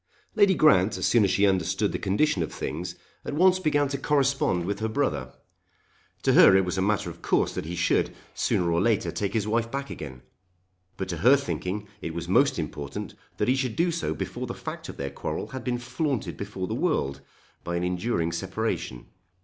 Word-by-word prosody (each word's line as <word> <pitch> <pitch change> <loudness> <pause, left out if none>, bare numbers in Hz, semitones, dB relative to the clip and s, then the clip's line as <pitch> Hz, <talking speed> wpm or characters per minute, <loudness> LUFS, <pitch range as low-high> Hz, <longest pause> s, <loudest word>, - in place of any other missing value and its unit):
Lady 200 -3 +5
Grant 110 - +4
as - - -1
soon 120 -3 +4
as 100 - +3
she 100 - +3
understood 95 +2 +1
the - - -3
condition 100 - +1
of 80 - -2
things - - -4 0.3
at - - -4
once 185 +3 +5
began 145 -5 +2
to 140 -1 -3
correspond 135 -11 +1
with 100 +2 -2
her 110 - 0
brother. 75 - -1 0.9
To - - +3
her 95 - +8
it 95 - +2
was 90 - -2
a 95 - 0
matter 100 -2 0
of - - -15
course - - +1
that - - -4
he 85 +2 -4
should, 85 0 +1 0.2
sooner 85 -1 +1
or 85 +1 +2
later, 110 0 +1
take 100 -1 -2
his 105 -2 0
wife 115 +1 0
back 140 +2 -4
again. 65 -4 -8 0.7
But 95 - -3
to 85 - -2
her 125 - +6
thinking 105 -7 -3
it 85 -2 -5
was 85 0 -4
most 140 +10 +3
important 75 -3 -5 0.2
that - - 0
he 130 - +4
should 130 -4 -1
do 170 +1 +2
so 160 - -2
before - - -4
the - - -5
fact - - -7
of - - -8
their 70 0 -4
quarrel - - -4
had 130 - -6
been 125 -1 -1
flaunted 125 +1 -2
before 100 -2 -5
the 110 - -4
world 115 - 0 0.4
by 85 - -3
an 85 - -1
enduring 90 -1 0
separation. 95 - -3
100 Hz, 205 wpm, -26 LUFS, 85-135 Hz, 0.9 s, her